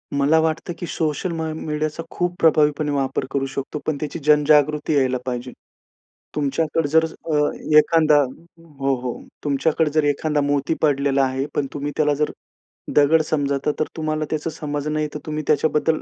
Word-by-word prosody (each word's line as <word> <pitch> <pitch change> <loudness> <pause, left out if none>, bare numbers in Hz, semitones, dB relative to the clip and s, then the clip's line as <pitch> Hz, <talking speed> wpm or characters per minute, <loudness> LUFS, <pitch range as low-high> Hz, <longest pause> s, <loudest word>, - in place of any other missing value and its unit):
मला 145 +3 +4
वाटतं 160 +2 -1
की - - -4
सोशल 160 +3 -2
म 160 - -3 0.2
मीडियाचा 155 +1 -2
खूप 175 0 -2
प्रभावीपणे 150 -2 +3
वापर 135 -1 -1
करू 135 -1 0
शकतो, 135 +2 -5
पण 155 -2 -1
त्याची 150 +3 -4
जनजागृती 150 0 +4
यायला 130 -2 +2
पाहिजे. 125 0 -4 0.8
तुमच्याकडे 150 +2 0
जर 160 +2 +4
अ, 160 -1 -5 0.4
एखादा 155 -1 +5
हो, 145 -1 -5
हो. 125 -1 -4 0.2
तुमच्याकडे 150 +2 +1
जर 155 0 +2
एखादा 145 +1 +1
मोती 145 +2 0
पडलेला 140 -2 +2
आहे, 130 +1 -2
पण 145 - +1
तुम्ही 145 0 -3
त्याला 150 -1 +3
जर 150 +1 0 0.6
दगड 150 +2 +5
समजता 140 -2 0
तर 155 - +2
तुम्हाला 155 -1 -1
त्याची 155 +1 -2
समज 150 -1 -4
नाहीये, 150 0 -1
तर - - -3
तुम्ही 155 0 -3
त्याच्याबद्दल 155 +1 +2
150 Hz, 155 wpm, -22 LUFS, 140-155 Hz, 0.8 s, एखादा